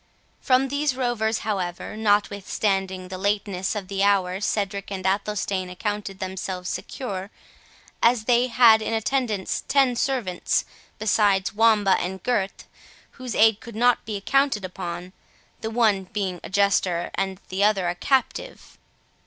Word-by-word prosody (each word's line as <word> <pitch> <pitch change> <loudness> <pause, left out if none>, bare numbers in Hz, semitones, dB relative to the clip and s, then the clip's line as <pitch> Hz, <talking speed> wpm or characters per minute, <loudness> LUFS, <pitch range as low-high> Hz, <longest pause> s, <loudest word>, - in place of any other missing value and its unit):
From 265 +1 +2
these 285 -1 0
rovers, 235 -3 0
however, 185 -5 -3
notwithstanding 200 -3 0
the 185 -1 -6
lateness 200 -1 -1
of 200 -3 -4
the 195 0 -3
hour 195 -2 +2
Cedric 200 -1 -2
and 190 -1 -5
Athelstane 195 -1 -1
accounted 205 +1 -4
themselves 185 -1 -4
secure, 200 -7 -5 0.7
as 235 -1 +4
they 245 +2 +3
had 230 -2 +6
in 225 - -2
attendance 220 -4 -1
ten 270 -3 +3
servants, 240 -9 0 0.3
besides 205 -2 +2
Wamba 215 -3 +4
and 190 +2 -4
Gurth, 200 -6 -1 0.5
whose 255 -3 -6
aid 220 -1 +5
could 230 -2 -11
not 245 +2 +3
be 210 -2 -4
counted 275 -7 +2
upon, 180 0 -6 0.5
the 220 - -4
one 220 -4 +2
being 190 -2 -3
a - - -7
jester 190 -3 +1
and 190 -1 -2
the 190 +2 0
other 200 -4 +3
a 175 - 0
captive. 265 - -2
205 Hz, 135 wpm, -24 LUFS, 190-225 Hz, 0.7 s, had